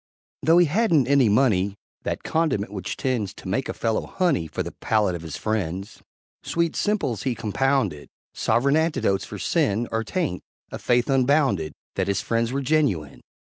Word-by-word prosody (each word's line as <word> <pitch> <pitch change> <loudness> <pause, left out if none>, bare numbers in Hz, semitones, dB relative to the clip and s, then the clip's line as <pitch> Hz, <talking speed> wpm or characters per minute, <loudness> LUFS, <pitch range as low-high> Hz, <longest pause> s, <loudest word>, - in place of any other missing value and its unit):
Though 165 +2 +5
he 175 - +6
hadn't 165 - +3
any 135 -3 +4
money 100 -4 +2 0.3
That - - -3
condiment 155 -12 0
which 95 -3 -4
tends 115 -7 -1
To - - -10
make 110 +8 -1
a - - -2
fellow 115 -1 -1
"honey" 160 - 0
For - - -3
the - - -6
palate 105 -4 0
of 85 - -5
his 80 -3 -6
friends; 100 -2 -3 0.4
Sweet 170 -1 -1
simples 190 - 0
he 125 +3 -1
compounded 125 - 0 0.2
Sovereign 140 +5 +2
antidotes 155 - +1
for - - -8
sin 110 +4 +1
Or 115 0 0
taint, 155 - -2 0.3
a - - -5
faith 120 -1 +2
unbounded 130 - +2 0.2
That 95 -1 0
his 100 - +1
friends 115 0 0
were 140 +1 -1
genuine. 130 - 0
115 Hz, 170 wpm, -24 LUFS, 100-140 Hz, 0.4 s, he